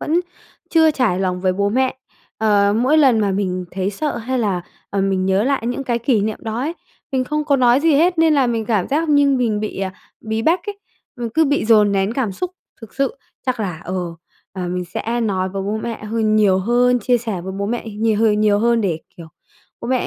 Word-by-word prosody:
vẫn 330 Hz, +4 st, +1 dB, 0.5 s
chưa 320 Hz, -1 st, +5 dB
trải 235 Hz, -10 st, 0 dB
lòng 180 Hz, -1 st, -1 dB
với 185 Hz, -1 st, +1 dB
bố 200 Hz, +2 st, 0 dB
mẹ. 260 Hz, +4 st, +1 dB, 0.4 s
Ờ, 205 Hz, -2 st, +3 dB
mỗi 265 Hz, +7 st, +3 dB
lần 255 Hz, -7 st, +5 dB
mà 200 Hz, -1 st, +1 dB
mình 185 Hz, -2 st, -2 dB
thấy 190 Hz, +1 st, -2 dB
sợ 295 Hz, +8 st, -3 dB
hay 255 Hz, +3 st, -2 dB
là, 200 Hz, -6 st, 0 dB, 0.3 s
ờm, 195 Hz, -1 st, 0 dB
mình 185 Hz, -1 st, 0 dB
nhớ 190 Hz, +2 st, +2 dB
lại 265 Hz, -4 st, 0 dB
những 250 Hz, +3 st, -2 dB
cái 240 Hz, -2 st, 0 dB
kỷ 235 Hz, -2 st, +1 dB
niệm 215 Hz, +1 st, -2 dB
đó 220 Hz, +1 st, -3 dB
ấy, 295 Hz, +6 st, -2 dB, 0.4 s
mình 260 Hz, -1 st, +1 dB
không 300 Hz, +2 st, -2 dB
có 285 Hz, -2 st, +2 dB
nói 250 Hz, +1 st, +4 dB
gì 320 Hz, -2 st, +3 dB
hết 340 Hz, +3 st, +3 dB
nên 320 Hz, -2 st, +4 dB
là 270 Hz, -3 st, +3 dB
mình 230 Hz, -2 st, -1 dB
cảm 210 Hz, -6 st, 0 dB
giác 310 Hz, +3 st, 0 dB
như 285 Hz, -1 st, +4 dB
mình 235 Hz, -5 st, +1 dB
bị, 215 Hz, -2 st, -4 dB
à, 190 Hz, -1 st, -2 dB, 0.3 s
bí 220 Hz, 0 st, -3 dB
bách 335 Hz, +5 st, +2 dB
ấy, 405 Hz, -1 st, -5 dB, 0.4 s
ừ, 235 Hz, -, -2 dB
cứ 320 Hz, 0 st, +4 dB
bị 285 Hz, -3 st, +1 dB
dồn 210 Hz, -3 st, +5 dB
nén 195 Hz, +2 st, +1 dB
cảm 235 Hz, -6 st, -1 dB
xúc 360 Hz, -, -4 dB, 0.3 s
thực 225 Hz, -, -12 dB
sự. 275 Hz, -, 0 dB, 0.3 s
Chắc 250 Hz, -3 st, -1 dB
là, 180 Hz, -6 st, -3 dB
ờ, 185 Hz, -, -4 dB, 0.6 s
ờm, 180 Hz, -1 st, -4 dB
mình 180 Hz, 0 st, -2 dB
sẽ 230 Hz, +7 st, -3 dB
nói 190 Hz, -4 st, 0 dB
với 195 Hz, 0 st, -4 dB
bố 205 Hz, +2 st, -2 dB
mẹ 220 Hz, -1 st, -5 dB
hơn 215 Hz, 0 st, +1 dB
nhiều 195 Hz, -3 st, +4 dB
hơn, 245 Hz, +4 st, +2 dB
chia 245 Hz, +2 st, +2 dB
sẻ 220 Hz, -6 st, -4 dB
với 190 Hz, +2 st, -6 dB
bố 200 Hz, -, -1 dB
mẹ 235 Hz, 0 st, -3 dB
nhiều 215 Hz, 0 st, 0 dB
h -, -, +1 dB, 0.2 s
nhiều 210 Hz, -1 st, +3 dB
hơn 235 Hz, +1 st, +2 dB
để, 175 Hz, -6 st, -1 dB, 0.2 s
kiểu, 170 Hz, -, -10 dB, 0.5 s
bố -, -, -6 dB
mẹ, 255 Hz, -1 st, +1 dB
225 Hz, 235 wpm, -19 LUFS, 200-260 Hz, 0.6 s, chưa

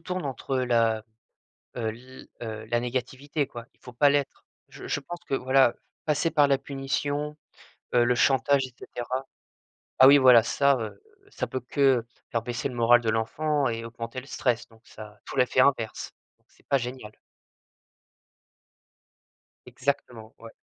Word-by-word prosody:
tourne 180 Hz, -1 st, -4 dB
entre 135 Hz, 0 st, -3 dB
la 115 Hz, -3 st, +1 dB, 0.7 s
heu, 115 Hz, -2 st, -2 dB
l 130 Hz, +2 st, -14 dB
heu, 110 Hz, -1 st, -6 dB
la 120 Hz, 0 st, 0 dB
négativité 130 Hz, +4 st, -3 dB
quoi, 120 Hz, -2 st, -9 dB
il -, -, -37 dB
faut 125 Hz, -, -12 dB
pas 145 Hz, +4 st, +5 dB
l'être. 145 Hz, -1 st, -1 dB, 0.2 s
Je -, -, -11 dB
je -, -, -1 dB
pense 175 Hz, +4 st, -8 dB
que 135 Hz, -, -1 dB
voilà, 130 Hz, -1 st, +3 dB, 0.3 s
passer 150 Hz, +2 st, +1 dB
par 145 Hz, -3 st, +4 dB
la 135 Hz, -1 st, +3 dB
punition, 145 Hz, +2 st, -3 dB, 0.6 s
heu, 120 Hz, -1 st, +5 dB
le 120 Hz, +1 st, +2 dB
chantage 135 Hz, +2 st, +3 dB
et 125 Hz, -, -16 dB
cetera 130 Hz, +2 st, -5 dB, 0.8 s
ah -, -, +11 dB
oui 140 Hz, +1 st, +9 dB
voilà, 125 Hz, -3 st, +7 dB
ça, 135 Hz, +5 st, +2 dB
heu, 110 Hz, -2 st, -6 dB, 0.3 s
ça -, -, -3 dB
peut 130 Hz, -, -4 dB
que 130 Hz, -1 st, +2 dB, 0.3 s
faire 115 Hz, -, 0 dB
baisser 120 Hz, +3 st, -3 dB
le 130 Hz, -, -8 dB
moral 120 Hz, +1 st, +5 dB
de 115 Hz, -, -1 dB
l'enfant 140 Hz, +6 st, 0 dB
et 115 Hz, 0 st, -4 dB
augmenter 115 Hz, +2 st, -6 dB
le 130 Hz, -, -13 dB
stress 125 Hz, -4 st, -1 dB
donc 115 Hz, -1 st, -22 dB
ça 105 Hz, -1 st, -12 dB
faut -, -, -7 dB
l'effet 125 Hz, 0 st, +2 dB
inverse. 130 Hz, -4 st, +1 dB, 0.4 s
C'est -, -, -29 dB
pas 140 Hz, -, +3 dB
génial. 125 Hz, -3 st, -6 dB, 2.6 s
Exactement, 125 Hz, -5 st, -4 dB
ouais. 115 Hz, 0 st, -12 dB
130 Hz, 160 wpm, -26 LUFS, 115-140 Hz, 2.6 s, ah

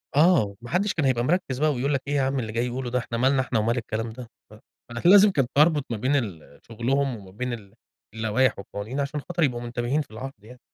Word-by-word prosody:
آه، 170 Hz, 0 st, +5 dB
و 100 Hz, 0 st, -9 dB
ماحدش 180 Hz, -, 0 dB
كان 160 Hz, -, 0 dB
هيبقى 125 Hz, -3 st, +2 dB
مركّز 135 Hz, -3 st, 0 dB
بقى 155 Hz, 0 st, +3 dB
ويقول 135 Hz, +3 st, -1 dB
لك 135 Hz, -, 0 dB
إيه 145 Hz, -, -1 dB
يا 140 Hz, -, +2 dB
عم 135 Hz, 0 st, 0 dB
اللي 110 Hz, -3 st, -4 dB
جاي 120 Hz, +2 st, 0 dB
يقوله 125 Hz, +1 st, -3 dB
ده، 125 Hz, +1 st, 0 dB
إحنا 115 Hz, -1 st, -4 dB
مالنا 130 Hz, +2 st, +3 dB
إحنا 130 Hz, -3 st, -1 dB
ومال 115 Hz, +3 st, +1 dB
الكلام 115 Hz, -1 st, -3 dB
ده، 120 Hz, +1 st, -9 dB, 0.2 s
فكان 120 Hz, -, -2 dB
لازم 205 Hz, 0 st, +8 dB
كنت 135 Hz, -8 st, 0 dB
اربط 150 Hz, -2 st, +4 dB
ما 115 Hz, -, -2 dB
بين 130 Hz, +7 st, +1 dB
ال 95 Hz, -, -4 dB
شغلهم 130 Hz, +4 st, 0 dB
وما 95 Hz, -3 st, -13 dB
بين 125 Hz, +5 st, -4 dB
ال 100 Hz, -4 st, -9 dB, 0.4 s
اللوايح 110 Hz, +3 st, +1 dB
والقوانين، 100 Hz, +7 st, -6 dB
عشان 140 Hz, +1 st, -2 dB
خاطر 175 Hz, +3 st, -2 dB
يبقوا 120 Hz, -5 st, 0 dB
منتبهين 120 Hz, +4 st, -1 dB
في 140 Hz, -, -10 dB
العرض 135 Hz, +5 st, -7 dB
يعني. 125 Hz, +3 st, -14 dB
125 Hz, 235 wpm, -25 LUFS, 115-140 Hz, 0.4 s, لازم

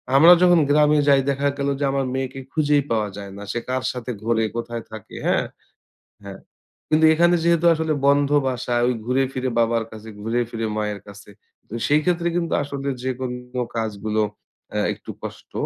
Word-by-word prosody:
আমরা 165 Hz, +5 st, +9 dB
যখন 175 Hz, -2 st, +6 dB
গ্রামে 150 Hz, +1 st, +4 dB
যাই 140 Hz, -1 st, +5 dB
দেখা 140 Hz, +1 st, 0 dB
গেল 140 Hz, 0 st, -1 dB
যে -, -, -1 dB
আমার 135 Hz, -1 st, 0 dB
মেয়েকে 135 Hz, 0 st, -3 dB
খুঁজেই 150 Hz, -2 st, +2 dB
পাওয়া 110 Hz, -2 st, 0 dB
যায় 100 Hz, -1 st, -8 dB
না। -, -, -9 dB
সে 120 Hz, -, -2 dB
কার 130 Hz, 0 st, -1 dB
সাথে 125 Hz, 0 st, -5 dB
ঘোরে, 115 Hz, -1 st, +1 dB
কোথায় 115 Hz, -1 st, -4 dB
থাকে 110 Hz, -2 st, -10 dB
হ্যাঁ? -, -, +2 dB, 0.8 s
হ্যাঁ। 100 Hz, -1 st, -9 dB, 0.5 s
কিন্তু 155 Hz, +1 st, +4 dB
এখানে 175 Hz, +2 st, +4 dB
যেহেতু 170 Hz, 0 st, +2 dB
আসলে 160 Hz, -1 st, -1 dB
বন্ধ 140 Hz, 0 st, +4 dB, 0.2 s
বাসা 125 Hz, -1 st, -2 dB
ওই 125 Hz, -, +2 dB
ঘুরে 130 Hz, +2 st, +2 dB
ফিরে 130 Hz, 0 st, -2 dB
বাবার 115 Hz, 0 st, +2 dB
কাছে, 110 Hz, 0 st, -10 dB
ঘুরে 115 Hz, +3 st, -1 dB
ফিরে 115 Hz, -1 st, -3 dB
মায়ের 105 Hz, -1 st, -2 dB
কাছে। 100 Hz, 0 st, -13 dB, 0.4 s
তো -, -, -12 dB
সেইক্ষেত্রে 170 Hz, +4 st, +2 dB
কিন্তু 170 Hz, -1 st, -1 dB
আসলে 140 Hz, -1 st, -5 dB, 0.2 s
যেকোনো 125 Hz, -1 st, -4 dB
কাজগুলো 110 Hz, -1 st, -1 dB, 0.5 s
অ্যা -, -, -1 dB
একটু -, -, -9 dB
কষ্ট। -, -, -9 dB
130 Hz, 175 wpm, -22 LUFS, 115-150 Hz, 0.8 s, আমরা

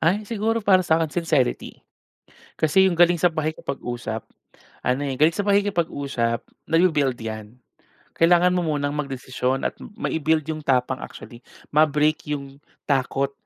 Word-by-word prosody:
Ay 190 Hz, +6 st, +1 dB
siguro 225 Hz, 0 st, -1 dB
para 185 Hz, -2 st, +5 dB
sa 160 Hz, -3 st, +2 dB
akin 160 Hz, -2 st, -1 dB
sincerity. 155 Hz, -7 st, -1 dB, 0.7 s
Kasi 190 Hz, +5 st, +4 dB
yung 170 Hz, -2 st, -3 dB
galing 175 Hz, -1 st, +5 dB
sa 180 Hz, -, +4 dB
pakikipag-usap 135 Hz, -8 st, -4 dB, 0.6 s
ano, 125 Hz, +2 st, +1 dB
eh, 135 Hz, -2 st, -2 dB
galing 160 Hz, +2 st, +4 dB
sa 205 Hz, -, -1 dB
pakikipag-usap 145 Hz, -12 st, 0 dB, 0.3 s
nabi-build 155 Hz, -7 st, +2 dB
'yan. 110 Hz, +2 st, -7 dB, 0.5 s
Kailangan 175 Hz, +2 st, +4 dB
mo 180 Hz, -, +1 dB
munang 145 Hz, 0 st, -1 dB
magdesisyon 130 Hz, -2 st, -2 dB
at -, -, -1 dB
mai-build 160 Hz, -6 st, -1 dB
yung 155 Hz, 0 st, -5 dB
tapang 130 Hz, -1 st, +1 dB
actually, 120 Hz, -2 st, -10 dB, 0.3 s
ma-break 150 Hz, 0 st, +2 dB
yung 140 Hz, -1 st, -5 dB, 0.3 s
takot 135 Hz, 0 st, 0 dB
150 Hz, 135 wpm, -23 LUFS, 135-175 Hz, 0.7 s, para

